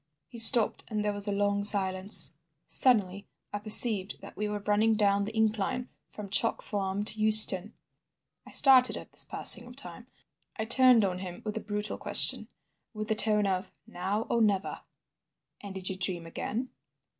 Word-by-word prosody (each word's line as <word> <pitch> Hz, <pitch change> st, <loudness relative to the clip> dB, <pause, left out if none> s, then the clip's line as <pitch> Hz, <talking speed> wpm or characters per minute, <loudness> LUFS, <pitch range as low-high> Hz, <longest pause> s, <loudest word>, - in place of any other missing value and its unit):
He 235 Hz, -, -12 dB
stopped, 225 Hz, 0 st, +6 dB
and 210 Hz, -2 st, -5 dB
there 210 Hz, -, -3 dB
was 205 Hz, 0 st, -3 dB
a -, -, -4 dB
long 200 Hz, 0 st, -3 dB
silence. 190 Hz, -3 st, +1 dB, 0.3 s
Suddenly 200 Hz, -6 st, -1 dB, 0.3 s
I 205 Hz, -, -5 dB
perceived 210 Hz, -2 st, +3 dB
that -, -, -14 dB
we 210 Hz, -, -6 dB
were 210 Hz, 0 st, -6 dB
running 215 Hz, +2 st, -1 dB
down 200 Hz, -1 st, -1 dB
the 220 Hz, +2 st, -10 dB
incline 220 Hz, +3 st, -4 dB, 0.2 s
from 210 Hz, -1 st, -12 dB
Chalk 230 Hz, +2 st, -2 dB
Farm 200 Hz, 0 st, -6 dB
to 215 Hz, -, -6 dB
Euston. 215 Hz, -2 st, +4 dB, 0.7 s
I -, -, -18 dB
started 260 Hz, -2 st, +3 dB
at -, -, -14 dB
this -, -, -2 dB
passing -, -, +2 dB
of -, -, -15 dB
time. -, -, -11 dB, 0.5 s
I 220 Hz, -, -6 dB
turned 245 Hz, -2 st, +3 dB
on 180 Hz, -1 st, -6 dB
him 180 Hz, -2 st, -11 dB
with 215 Hz, -, -7 dB
a -, -, -5 dB
brutal 210 Hz, 0 st, -7 dB
question, -, -, +5 dB, 0.5 s
with 215 Hz, +1 st, -7 dB
the -, -, 0 dB
tone 210 Hz, -1 st, 0 dB
of 190 Hz, -1 st, -5 dB
"Now 195 Hz, +5 st, -6 dB
or 235 Hz, -, -3 dB
never." 200 Hz, -3 st, -3 dB, 0.8 s
"And 200 Hz, -1 st, -12 dB
did 185 Hz, -1 st, -8 dB
you 190 Hz, -, -4 dB
dream 180 Hz, -3 st, -2 dB
again?" 230 Hz, +9 st, -8 dB
210 Hz, 175 wpm, -26 LUFS, 195-220 Hz, 0.8 s, stopped